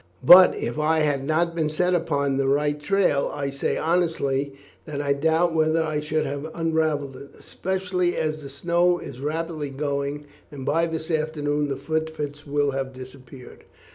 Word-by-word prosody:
But 180 Hz, +7 st, +9 dB
if 120 Hz, +5 st, -4 dB
I 160 Hz, +1 st, +2 dB
had 145 Hz, -3 st, 0 dB
not 165 Hz, +4 st, 0 dB
been 160 Hz, -2 st, 0 dB
set 180 Hz, +4 st, 0 dB
upon 140 Hz, -5 st, 0 dB
the 135 Hz, -1 st, +1 dB
right 145 Hz, +2 st, +1 dB
trail, 180 Hz, -4 st, +1 dB
I 140 Hz, -1 st, -3 dB
say 140 Hz, -, -2 dB
honestly 150 Hz, -5 st, 0 dB, 0.3 s
that 145 Hz, -2 st, -5 dB
I 140 Hz, -1 st, +1 dB
doubt 160 Hz, +4 st, +1 dB
whether 160 Hz, 0 st, +2 dB
I 155 Hz, -1 st, -2 dB
should 155 Hz, +1 st, -1 dB
have 145 Hz, +2 st, -4 dB
unravelled 155 Hz, -4 st, -1 dB
it, 140 Hz, +2 st, -12 dB
especially 180 Hz, -1 st, -2 dB
as 155 Hz, 0 st, -2 dB
the 140 Hz, -, -9 dB
snow 175 Hz, +5 st, +1 dB
is 130 Hz, -7 st, -9 dB
rapidly 155 Hz, 0 st, -3 dB
going, 140 Hz, +1 st, -3 dB, 0.3 s
and 135 Hz, -3 st, -8 dB
by 165 Hz, +4 st, +1 dB
this 160 Hz, 0 st, -5 dB
afternoon 150 Hz, -2 st, -1 dB
the 135 Hz, -2 st, -3 dB
footprints 150 Hz, -1 st, -4 dB
will 145 Hz, 0 st, +1 dB
have 135 Hz, -1 st, -4 dB
disappeared." 130 Hz, 0 st, -12 dB
150 Hz, 170 wpm, -24 LUFS, 140-160 Hz, 0.3 s, But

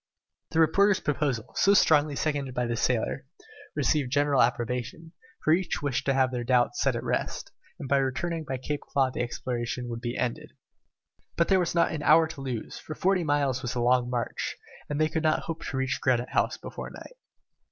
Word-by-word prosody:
The 160 Hz, -, 0 dB
reporter's 195 Hz, +5 st, +4 dB
proposal, 140 Hz, -6 st, -2 dB
so 200 Hz, +1 st, +4 dB
strongly 150 Hz, -5 st, +4 dB
seconded 140 Hz, -3 st, -2 dB
by 125 Hz, -, 0 dB
the 120 Hz, 0 st, -1 dB
sailor, -, -, -1 dB, 0.5 s
received 140 Hz, -5 st, +1 dB
general 145 Hz, -1 st, +3 dB
approbation, 125 Hz, +7 st, -1 dB, 0.3 s
for 155 Hz, -, +4 dB
each 180 Hz, -3 st, -1 dB
wished 140 Hz, -2 st, -1 dB
to 135 Hz, -, +3 dB
have 130 Hz, -1 st, +3 dB
their 125 Hz, -1 st, -3 dB
doubts 120 Hz, 0 st, +2 dB
set -, -, +2 dB
at -, -, -3 dB
rest, -, -, -2 dB, 0.3 s
and 140 Hz, -, -6 dB
by 140 Hz, -, +3 dB
returning 155 Hz, +5 st, -1 dB
by 135 Hz, -3 st, -4 dB
Claw -, -, -15 dB
Cape 135 Hz, -2 st, -1 dB
the -, -, -2 dB
exploration 120 Hz, 0 st, -3 dB
would 115 Hz, 0 st, -5 dB
be 120 Hz, -1 st, -3 dB
ended. 125 Hz, -2 st, -3 dB, 0.8 s
But 170 Hz, -, +2 dB
there 190 Hz, -1 st, +5 dB
was 175 Hz, -1 st, -1 dB
not 170 Hz, -1 st, +3 dB
an 160 Hz, -2 st, -3 dB
hour 160 Hz, +2 st, +6 dB
to 160 Hz, -4 st, -8 dB
lose, 125 Hz, -5 st, -5 dB
for 155 Hz, -, -8 dB
forty 185 Hz, -1 st, +2 dB
miles 145 Hz, -4 st, +1 dB
was 125 Hz, -, -4 dB
a -, -, -1 dB
long 125 Hz, 0 st, +2 dB
march, 120 Hz, -1 st, -3 dB, 0.3 s
and 145 Hz, 0 st, -2 dB
they 155 Hz, -, +4 dB
could 160 Hz, 0 st, -2 dB
not 155 Hz, 0 st, +2 dB
hope 165 Hz, -1 st, -5 dB
to 130 Hz, -, -3 dB
reach 130 Hz, 0 st, -1 dB
Granite 125 Hz, -1 st, +1 dB
House -, -, 0 dB
before -, -, -7 dB
night. -, -, -11 dB
135 Hz, 200 wpm, -27 LUFS, 125-155 Hz, 0.8 s, hour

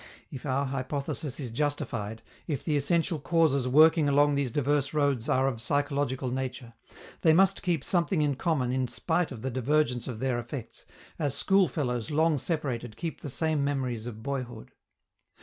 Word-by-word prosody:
If 135 Hz, +1 st, -7 dB
our 135 Hz, +2 st, +1 dB
hypothesis 135 Hz, +1 st, -3 dB
is 130 Hz, -5 st, -5 dB
justified, 115 Hz, -6 st, -3 dB, 0.2 s
if 145 Hz, -5 st, -2 dB
the 155 Hz, -, 0 dB
essential 165 Hz, +3 st, +1 dB
causes 140 Hz, -3 st, +2 dB
working 155 Hz, +2 st, +5 dB
along 145 Hz, +1 st, +4 dB
these 140 Hz, -2 st, 0 dB
diverse 145 Hz, +3 st, 0 dB
roads 140 Hz, -6 st, +1 dB
are 130 Hz, +1 st, +3 dB
of 120 Hz, -4 st, -2 dB
psychological 140 Hz, -1 st, 0 dB
nature, 125 Hz, -2 st, -4 dB, 0.5 s
they 160 Hz, -, +5 dB
must 195 Hz, +3 st, +4 dB
keep 175 Hz, -7 st, 0 dB
something 175 Hz, -2 st, +1 dB
in 145 Hz, -1 st, +1 dB
common 135 Hz, -3 st, 0 dB
in 130 Hz, 0 st, 0 dB
spite 170 Hz, +6 st, -1 dB
of 120 Hz, -3 st, -8 dB
the 130 Hz, -, -2 dB
divergence 130 Hz, 0 st, +1 dB
of 125 Hz, -4 st, -4 dB
their 125 Hz, 0 st, -1 dB
effects, 120 Hz, 0 st, -8 dB, 0.3 s
as 145 Hz, -3 st, 0 dB
school 195 Hz, -1 st, +3 dB
fellows 125 Hz, -6 st, -2 dB
long 155 Hz, 0 st, +2 dB
separated 125 Hz, -8 st, -3 dB
keep 165 Hz, -2 st, -5 dB
the 145 Hz, -, -5 dB
same 155 Hz, +2 st, 0 dB
memories 130 Hz, -5 st, -2 dB
of 110 Hz, -2 st, -8 dB
boyhood. 125 Hz, -5 st, -5 dB
140 Hz, 165 wpm, -28 LUFS, 125-155 Hz, 0.5 s, working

